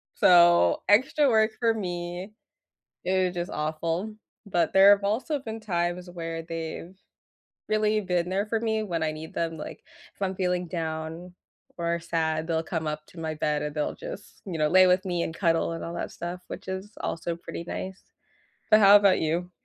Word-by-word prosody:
So, 175 - +5
extra 260 +8 +4
work 220 -1 +3
for 230 -1 +3
me, 180 -1 -5 0.7
it 185 0 +2
was 180 - -7
just 175 0 -3
awful, 165 +7 -2 0.3
but 175 -4 +1
there 195 +1 +8
have 200 - -11
also 245 +9 0
been 225 -3 -6
times 175 -2 -2
where 165 -1 -5
they've 165 +2 -6 0.7
really 215 0 +2
been 180 -2 -1
there 195 +3 0
for 225 +1 -1
me 220 -1 0
when 170 -6 -2
I 155 - 0
need 155 +1 -8
them. 165 -1 -2
Like, 150 - -8 0.3
if - - -29
I'm 190 -1 -1
feeling 180 -1 -1
down 160 +1 -4 0.4
or 170 0 -1
sad, 160 -1 -1
they'll 165 -1 0
come 160 -1 -3
up 150 0 -4
to 170 - -13
my 160 -1 -3
bed, 150 -1 0
and 150 0 -4
they'll 150 - -1
just, - - -9
you 180 -4 -4
know, 155 -1 +2
lay 185 +2 +7
with 180 +1 +3
me 175 -2 -1
and 165 - -4
cuddle 165 -2 +1
and 165 - -6
all 170 - -5
that - - -4
stuff, 175 +1 -6
which - - -8
is 190 +2 -5
also 170 +1 -3
pretty 170 0 -7
nice. 190 0 -5 0.7
But 215 - +8
how 200 -1 +8
about 200 -2 +5
you? 170 +3 -1
175 Hz, 190 wpm, -27 LUFS, 165-195 Hz, 0.7 s, there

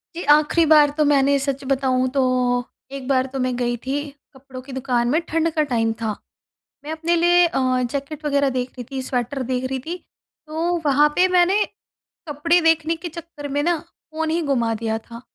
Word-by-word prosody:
जी, 345 - -4
आखिरी 305 +3 +4
बार 300 -1 +6
तो 305 - +3
मैंने 280 -1 +3
सच 275 0 -3
बताऊँ 260 -1 +1
तो 270 +1 0 0.7
1 275 -2 -7
बार 260 -2 +2
तो 270 - -3
मैं 255 -1 0
गई 240 -1 0
थी, 280 +5 -4 0.2
कपड़ों 260 -1 -11
की 270 - -12
दुकान 250 -2 0
में 305 +6 +2
ठंड 330 +1 +1
का 310 - +2
टाइम 225 -2 +1
था। 215 -2 -2 0.7
मैं 300 - -6
अपने 325 +2 0
लिए 350 +1 +5
अ, 255 -5 0
जैकेट 285 +2 -5
वग़ैरह 280 -1 +2
देख 255 -1 -2
रही 245 - -8
थी, 265 -1 -3
स्वेटर 255 +1 -3
देख 255 0 -1
रही 265 0 -2
थी। 330 +7 -6 0.5
तो 330 +3 -1
वहाँ 295 +1 +4
पे 370 - +4
मैंने 365 +3 +3 0.6
कपड़े 315 +4 +2
देखने 325 0 +2
के 330 +2 -7
चक्कर 330 -3 -9
में 285 +1 -1
ना, 345 +1 +2 0.3
फ़ोन 320 0 -2
ही 330 +2 0
गुमा 240 -7 0
दिया 220 0 -2
था। 230 +1 -11
280 Hz, 195 wpm, -21 LUFS, 255-320 Hz, 0.7 s, बार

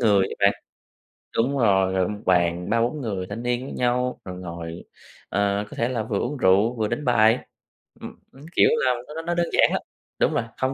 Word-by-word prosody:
người 100 -5 +4
á - - -6
bạn. 100 - +5 0.9
Đúng 135 +5 +1
rồi, 95 -6 +3
gọi 95 -1 +1
1 105 - -5
bàn 90 0 +2
3-4 120 +6 0
người 100 -6 -3
thanh 115 - -5
niên 120 +1 -1
với - - -7
nhau, 125 +1 0
rồi 90 -1 -7
ngồi, 85 -2 -7 0.5
ờ, 100 +1 0
có - - -10
thể 115 - +1
là 120 -4 -2
vừa 105 -2 -2
uống 140 +4 -2
rượu, 100 +4 +3
vừa 110 -2 0
đánh 150 - -3
bài. 115 -1 +4 0.6
Ừm, - - -8 0.2
ưm, 135 +3 -15
kiểu - - +6 0.2
là, 130 - +3
nó 150 - -9
nó 165 - -3
nó 170 +1 -2
đơn 170 0 +1
giản - - +4
lắm. - - 0 0.4
Đúng - - +2
rồi, - - 0
không 130 0 0
110 Hz, 220 wpm, -24 LUFS, 95-125 Hz, 0.9 s, kiểu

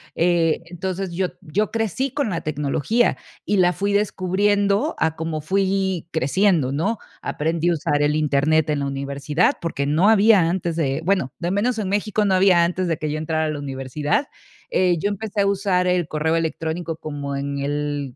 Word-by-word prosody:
eh, 170 -2 +2
entonces 185 +2 -4
yo 185 +1 -1
yo 205 +8 -1
crecí 230 +4 -1
con 280 -7 -1
la 170 - -2
tecnología 155 - 0 0.3
y 205 - +1
la 180 -1 +4
fui 200 +4 -1
descubriendo 205 - +1
a 160 0 +1
como 160 -1 -3
fui 190 0 0
creciendo, 160 -1 +2
¿no? 195 +10 -1 0.2
Aprendí 165 +3 -1
a - - +3
usar 150 -2 0
el 150 +1 +2
Internet 155 +1 +2
en 150 -1 0
la 140 - -1
universidad, 140 +4 0
porque 140 -4 -2
no 165 +8 +3
había 215 -2 +6
antes 175 -2 -2
de, 145 -2 -1
bueno, 185 -9 +1
de 170 - -2
al - - -1
menos 225 +2 0
en 195 -3 -2
México 210 +1 0
no 190 -1 +3
había 185 -2 +5
antes 180 +1 -1
de 165 - 0
que 155 - -3
yo 155 - -2
entrara 160 0 -1
a - - -1
la 150 - -3
universidad. 145 - -2 0.4
Eh, 180 -2 +2
yo 205 - 0
empecé 205 0 -2
a 200 - +2
usar 190 -2 +1
el 180 -3 +1
correo 160 +1 0
electrónico 165 0 -2
como 145 -3 -5
en 140 0 -3
el 145 -2 -3
170 Hz, 190 wpm, -22 LUFS, 150-195 Hz, 0.4 s, había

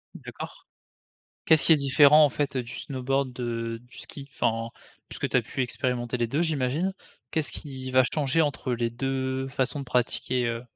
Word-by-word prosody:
D'accord, - - -9 0.8
qu'est-ce 160 -1 +6
qui - - +6
est - - +7
différent, 145 +2 +6
en 145 - +3
fait, 140 0 -2
heu, 130 - 0
du 120 +1 -9
snowboard 135 -1 -2
de 115 -2 -3
du 125 0 -14
ski? 140 -1 -8
Enfin, 115 0 0 0.4
puisque - - -3
tu - - +1
as - - +3
pu - - -5
expérimenter 125 0 -2
les 120 -1 0
2 140 +8 0
j'imagine? 160 +4 0 0.4
Qu'est-ce 160 +1 +1
qui 130 -3 -6
va 130 0 +5
changer 150 +1 +1
entre 145 -4 0
les 120 -1 0
2 130 +1 -2
façons 135 +1 -1
de - - -6
pratiquer, 125 0 0
heu 115 0 -2
130 Hz, 185 wpm, -26 LUFS, 125-145 Hz, 0.8 s, est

